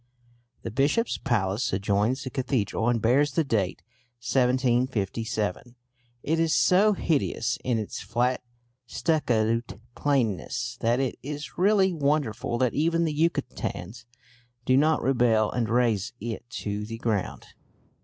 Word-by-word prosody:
The - - -4
bishop's 145 - +1
palace 105 0 0
adjoins 100 +7 0
the 130 - -6
cathedral, 125 -4 -1
and 120 -1 +2
bears 130 +6 +2
the 165 - +2
date 105 -9 -1 0.4
1757. 120 -4 0 0.5
It 160 +2 0
is 165 -1 +2
so 205 +4 +4
hideous 140 - -1
in 125 -2 0
its 110 -2 -4
flat 125 +1 0 0.5
stuccoed 115 - 0
plainness 120 - -1
that 120 +2 +2
it 135 -3 -2
is 145 +2 -6
really 190 0 +3
wonderful 140 -6 0
that 125 -1 +1
even 165 +2 +1
the 155 - -1
Yucatecans 120 - -2 0.6
do 130 - +3
not 155 +3 +3
rebel 120 -4 +2
and 115 -3 -1
raze 115 -5 +1
it 115 +2 -6
to 105 -2 -4
the 115 +2 -6
ground. 110 -4 -2
125 Hz, 125 wpm, -26 LUFS, 110-145 Hz, 0.6 s, so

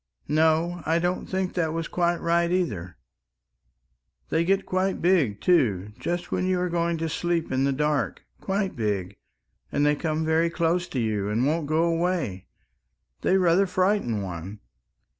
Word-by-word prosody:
No, 160 +3 +2
I 160 +1 +1
don't 175 +2 -1
think 190 -1 -2
that 160 -3 0
was 165 0 -3
quite 175 -1 +1
right 170 +1 +2
either. 105 - -2 1.3
They 160 - +2
get 195 +3 +1
quite 185 +1 0
big, 160 - +2
too, 105 - +2
just 175 0 -3
when 185 - 0
you 185 -1 +1
are 180 0 0
going 170 0 0
to 165 0 -2
sleep 170 +1 -1
in 130 +1 +1
the 140 - +2
dark 150 +1 -1 0.2
quite 195 0 -2
big, 100 -4 -2 0.5
and 145 - +1
they 150 0 +3
come 160 +1 -2
very 160 +1 +2
close 170 +1 0
to 130 - -3
you 105 -3 -1
and 115 +4 +1
won't 155 +1 0
go 155 +2 +2
away... 165 - -1 0.7
they 190 - +3
rather 185 +1 +3
frighten 185 - +1
one...." 95 +3 -7
165 Hz, 160 wpm, -25 LUFS, 130-175 Hz, 1.3 s, they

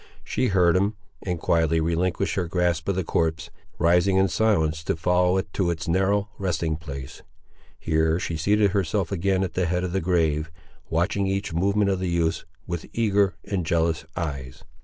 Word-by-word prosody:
She 130 - 0
heard 90 -4 +3
him, 100 +3 +1 0.3
and 90 -3 -3
quietly 80 0 +2
relinquished 85 +4 0
her 90 -3 -1
grasp 85 -1 0
of 100 - +1
the 95 - 0
corpse, 80 -1 -1 0.3
rising 90 +3 +3
in 95 0 +3
silence 80 -9 +1
to - - 0
follow 90 +2 +2
it 95 -2 -3
to 95 -3 0
its 85 -1 -3
narrow 95 +4 +1
resting 85 -4 -1
place. 70 -5 -8 0.6
Here 80 +1 +1
she 85 - -3
seated 100 +5 +2
herself 95 -2 0
again 95 0 +1
at 95 - -3
the 90 -2 0
head 90 +2 0
of 90 - -2
the 95 - 0
grave, 80 -3 +1 0.4
watching 95 +4 0
each 95 -2 -2
movement 100 +4 +2
of 95 - -1
the 95 -1 -2
youths 85 -1 0 0.2
with 85 -2 -5
eager 100 -5 +2
and 95 -3 -2
jealous 80 -1 0
eyes. 70 -7 -5
90 Hz, 180 wpm, -25 LUFS, 80-95 Hz, 0.6 s, heard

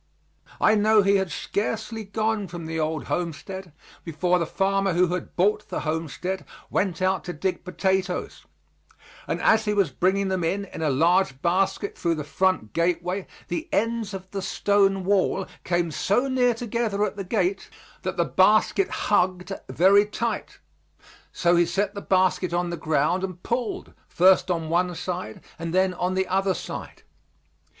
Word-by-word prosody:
I 215 - +5
know 215 0 +4
he 200 +1 +4
had 190 -3 -2
scarcely 220 +5 -3
gone 215 0 -1
from 170 -2 -7
the 160 0 -3
old 155 0 -1
homestead 175 +2 -4 0.3
before 180 +2 +1
the 170 - -1
farmer 195 0 +1
who 180 +1 +3
had 180 - -5
bought 210 +3 +1
the - - -3
homestead 165 +4 -3 0.3
went 185 -2 0
out 190 0 +1
to 175 - -4
dig 185 +4 -2
potatoes, 190 0 -1 0.8
and - - -1
as 220 0 +4
he 210 0 0
was 195 -8 +2
bringing 190 +7 +1
them 185 -2 -1
in 195 +5 -1
in 185 - -9
a 155 - +1
large 165 +1 +2
basket 190 +3 0
through 170 -1 0
the 150 - -4
front 165 - 0
gateway, 175 +3 0 0.2
the 335 +1 -4
ends 225 -2 0
of 190 0 -8
the 195 - -3
stone 195 0 +2
wall 195 -1 +2 0.2
came 175 -1 0
so 245 - +1
near 250 -2 +2
together 225 -3 -1
at - - -4
the 200 - -4
gate 190 0 -1 0.3
that - - -4
the - - +2
basket 390 - +3
hugged 185 -2 0 0.2
very 200 +4 +5
tight. 210 - -3 0.7
So 175 0 +2
he 170 0 +4
set 195 +3 -1
the 200 - -6
basket 185 -2 +1
on 175 0 0
the - - -2
ground 155 +3 0
and 185 -2 -5
pulled, 235 -2 -3
first 185 +1 +4
on 165 -3 -1
one 175 +2 +1
side 175 -11 -5 0.2
and 165 +1 -3
then 185 0 +3
on 180 +1 -1
the 190 0 0
other 190 0 +1
side. - - -7
185 Hz, 165 wpm, -25 LUFS, 175-200 Hz, 0.8 s, I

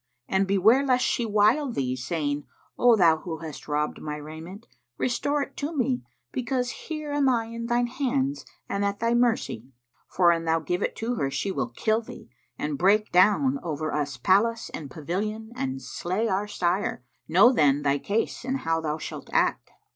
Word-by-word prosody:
And 190 0 +1
beware 210 +7 +4
lest 255 -2 +2
she 235 - 0
wile 215 +7 +3
thee, 130 - -1
saying, 145 +1 -2 0.3
'O 245 -1 +5
thou 170 -6 +5
who 160 0 -6
hast 160 -3 -9
robbed 150 0 -1
my 150 -1 -4
raiment, 160 +7 -9 0.3
restore 285 +3 0
it 275 - -11
to 300 +2 -3
me, 130 - +1 0.3
because 250 -1 -1
here 305 -2 -6
am 285 -2 +3
I 235 -3 +1
in 230 +1 -6
thine 240 +1 +2
hands 270 +2 -1 0.2
and 200 0 -1
at 200 0 -1
thy 230 +1 +1
mercy!' 225 - 0 0.4
For, 175 -2 +4
an 165 -1 -1
thou 165 0 +2
give 175 +4 -2
it - - -2
her, 225 - -1
she 140 +8 -2
will 135 -9 -2
kill 220 - 0
thee 125 - -12 0.3
and 150 -2 -3
break 210 +4 +3
down 215 +10 +4
over 155 -3 -3
us 145 -3 -2
palace 220 - +2
and 145 -3 -6
pavilion 210 +9 -4
and 135 - -3
slay 185 - -2
our 200 0 0
sire: 180 -7 -1 0.2
know, 195 +10 +6
then, 145 - +3
thy 140 0 +2
case 215 +8 -2
and 265 +2 -2
how 165 0 0
thou 155 -1 -2
shalt - - -7
act. - - +1
200 Hz, 180 wpm, -26 LUFS, 155-240 Hz, 0.4 s, know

